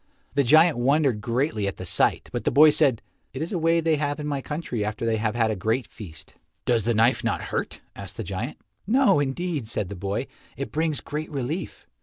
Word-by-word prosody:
The 140 - +3
giant 155 +2 +5
wondered 135 -3 +2
greatly 115 -2 -1
at 100 - -4
the 90 - -7
sight, - - +2
but - - -3
the - - +2
boy 155 +1 +7
said, 130 -5 +2 0.3
"It 135 - -5
is 170 - -5
a 180 - 0
way 165 +1 +3
they 160 -1 +1
have 145 0 -2
in 150 - -4
my 145 -2 -2
country 145 -7 -4
after 105 +2 -3
they 115 -1 +1
have 110 +1 -1
had 115 -2 +2
a - - -1
great 110 +6 -1
feast." 80 -8 -12 0.3
"Does 115 -4 +1
the 120 -1 +1
knife 115 +4 +3
not - - 0
hurt?" - - -3
asked 100 -2 -9
the 115 - -3
giant. 105 - -4 0.3
"No, 250 - +4
indeed," 145 -1 -2
said 105 -4 -2
the 100 - -6
boy, 100 +7 -3 0.3
"it 140 - -5
brings 155 -1 -1
great 150 +2 -5
relief." 145 +5 -4
130 Hz, 220 wpm, -25 LUFS, 110-155 Hz, 0.3 s, boy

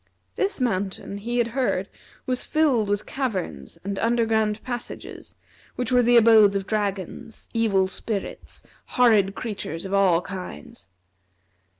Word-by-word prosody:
This 395 -4 0
mountain 200 -3 -2
he 240 +4 -3
had 235 -1 +2
heard 235 -6 0 0.4
was 255 -1 -1
filled 275 -10 +2
with 205 0 -1
caverns 190 - -4
and 200 0 -3
under 230 0 +2
ground 220 -1 0
passages, 245 -2 -7 0.4
which 250 0 -2
were 250 -1 +5
the 240 0 +5
abodes 220 -3 +6
of 195 -1 -1
dragons, 205 +1 -3
evil 210 -4 +2
spirits, 200 +1 -4 0.3
horrid 215 -5 +4
creatures 195 -7 -5
of 190 - -5
all 190 -4 +4
kinds. 180 - -8
215 Hz, 130 wpm, -24 LUFS, 195-240 Hz, 0.4 s, abodes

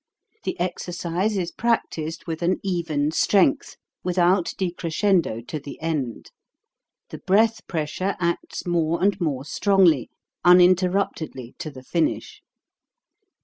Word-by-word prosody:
The - - -3
exercise 180 +3 -2
is 175 -2 -2
practised 165 -9 -2
with 165 -1 -4
an 175 +2 +1
even 165 -6 -1
strength, 210 - +2 0.3
without 180 0 +2
decrescendo 175 - 0
to 155 - -4
the 140 0 -10
end; 150 -8 -3 0.8
the - - -8
breath 220 +4 +2
pressure 170 +4 -2
acts 170 -1 -2
more 170 -1 +1
and 200 -1 +2
more 140 -5 -1
strongly, 180 - +3 0.3
unin 180 +1 +7
terruptedly 175 -9 -2
to 155 - -4
the 130 -3 -12
finish. 165 +4 -2
175 Hz, 115 wpm, -23 LUFS, 155-190 Hz, 0.8 s, unin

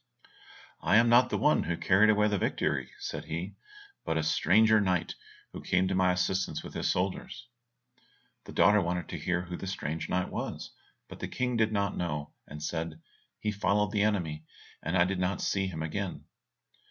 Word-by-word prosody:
"I - - +3
am 115 +1 +6
not 125 +2 +6
the - - 0
one 150 - +3
who 85 - -2
carried 100 +3 +4
away 105 0 +4
the 105 -2 0
victory," - - -1
said - - -5
he, 85 +5 -4 0.5
"but 80 - -1
a 80 - 0
stranger 105 +8 +4
knight 90 -3 0 0.4
who - - -7
came 95 +1 +1
to 95 - -1
my 90 -1 +3
assistance 95 +1 -1
with - - -9
his - - -1
soldiers." 95 +5 -2 1.0
The - - -9
daughter 105 0 +5
wanted 90 -2 -2
to - - -5
hear 90 -1 -1
who 90 -1 -6
the 95 - -6
strange 80 -4 -4
knight 90 0 0
was, - - -5 0.4
but - - -11
the - - -4
King 125 -1 -2
did 110 -1 +2
not 100 -2 0
know, 75 -4 -3
and 75 +1 -8
said, 80 -1 -3 0.4
"He 105 - -1
followed 105 0 +1
the 105 -2 +1
enemy, 85 -8 0 0.4
and 85 +4 -1
I 85 - +6
did 95 0 -2
not 90 +1 0
see 95 -1 0
him 80 -4 -4
again." 90 +4 -4
95 Hz, 190 wpm, -29 LUFS, 85-105 Hz, 1.0 s, am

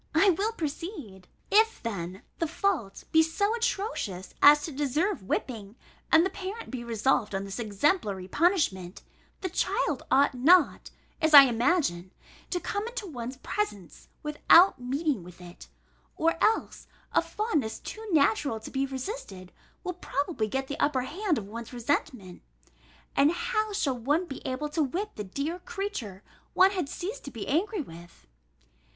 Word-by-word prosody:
I 385 +5 +6
will 405 +6 0
proceed. 295 - -6 0.2
If, 445 +2 +4
then, 190 -3 -5 0.2
the 330 - 0
fault 320 - -1
be 320 - +6
so 405 +7 0
atrocious 400 - -2
as 295 +1 +8
to 320 - -4
deserve 295 +8 -1
whipping, 210 +1 -4 0.4
and 325 +2 +6
the 380 - -1
parent 390 +4 -6
be 250 -2 -5
resolved 225 -2 0
on 195 - -2
this 195 +3 -6
exemplary 210 - 0
punishment, 200 - 0 0.4
the 370 - -2
child 300 -4 0
ought 280 +1 +4
not, 310 +7 +4 0.3
as 315 -1 +5
I 280 - +13
imagine, 240 - +1 0.4
to 355 - -1
come 405 +4 -3
into 475 -2 -5
one's 255 -6 -6
presence 205 - -4 0.2
without 300 +1 +5
meeting 275 - -1
with 175 0 -13
it: 175 0 -12 0.5
or 330 +1 +2
else, 440 +1 +1 0.3
a - - +4
fondness 310 - -2
too 440 - -8
natural 280 -5 +2
to - - -9
be 270 0 0
resisted, 260 - -6 0.3
will 360 - -3
probably 285 -8 -2
get 265 +5 -2
the 280 +1 -6
upper 270 -3 +2
hand 350 +4 -1
of 200 - -5
one's 230 +3 -8
resentment, 240 -6 -2 0.7
and 285 +3 +5
how 435 +2 -1
shall 285 -11 -1
one 295 +9 +1
be 275 -6 -8
able 260 +3 -3
to 315 +2 -1
whip 360 +10 -2
the 210 - -5
dear 280 - -4
creature 390 - -5 0.3
one 380 +1 +6
had 360 -8 -2
ceased 400 +11 -5
to - - -5
be 230 -6 -7
angry 365 - 0
with? 170 -4 -14
285 Hz, 155 wpm, -28 LUFS, 225-370 Hz, 0.7 s, I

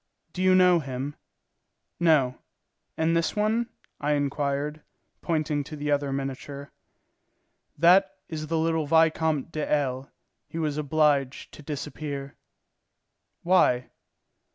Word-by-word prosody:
Do 185 - -4
you 185 0 +5
know 180 -2 +5
him?" 135 0 -5 0.9
"No. 150 -7 +3 0.6
And 160 +1 +2
this 165 0 0
one?" 220 +3 +1 0.3
I 150 +1 +1
inquired, 145 +1 -1 0.4
pointing 155 -3 -1
to 155 - -8
the 145 0 -3
other 145 -1 +1
miniature. 140 +1 -5 1.1
"That 185 +5 +5
is 155 -2 -5
the 165 +1 0
little 160 -1 0
Vicomte 160 -1 +2
de 155 -2 -3
L. 135 -2 0 0.4
He - - -8
was 150 -2 -1
obliged 145 -2 +1
to - - -11
disappear." 145 -1 -6 1.1
"Why?" 150 -9 +3
150 Hz, 115 wpm, -26 LUFS, 140-165 Hz, 1.1 s, you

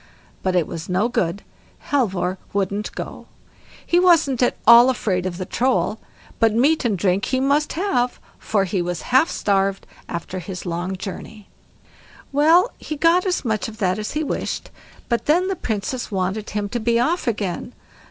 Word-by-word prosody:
But 185 -1 0
it 175 -3 +3
was 165 -1 -7
no 190 +5 +2
good, 175 -4 -1 0.5
Halvor 190 -9 0
wouldn't 200 +1 -1
go; - - -7 0.6
he 345 - +3
wasn't 330 -8 +4
at 245 - +2
all 235 +2 +9
afraid 185 -7 -1
of 175 -2 -5
the 185 - -4
Troll, 245 -1 0 0.4
but 225 -1 +3
meat 285 +7 +3
and 220 -5 +1
drink 185 +1 +1
he 260 - 0
must 285 +3 +1
have, 260 -9 0 0.2
for 205 -3 0
he 185 -1 -1
was 175 -1 -3
half 270 +6 +5
starved 195 -1 0 0.2
after 170 +2 -5
his 185 +1 -7
long 175 +2 -3
journey. 200 +2 -8 0.8
Well, 320 - +4
he 305 - -5
got 340 +5 +3
as 360 -6 -1
much 220 +3 -1
of 220 -1 -9
that 185 -2 0
as 215 - -4
he 305 +1 -1
wished, - - -4 0.4
but 235 -1 -1
then 355 +5 +3
the 385 - -1
Princess 225 - -3
wanted 195 +2 -2
him 205 -1 -2
to 240 - -2
be 235 +1 +1
off 320 +7 0
again. 205 0 -2
220 Hz, 170 wpm, -21 LUFS, 190-270 Hz, 0.8 s, all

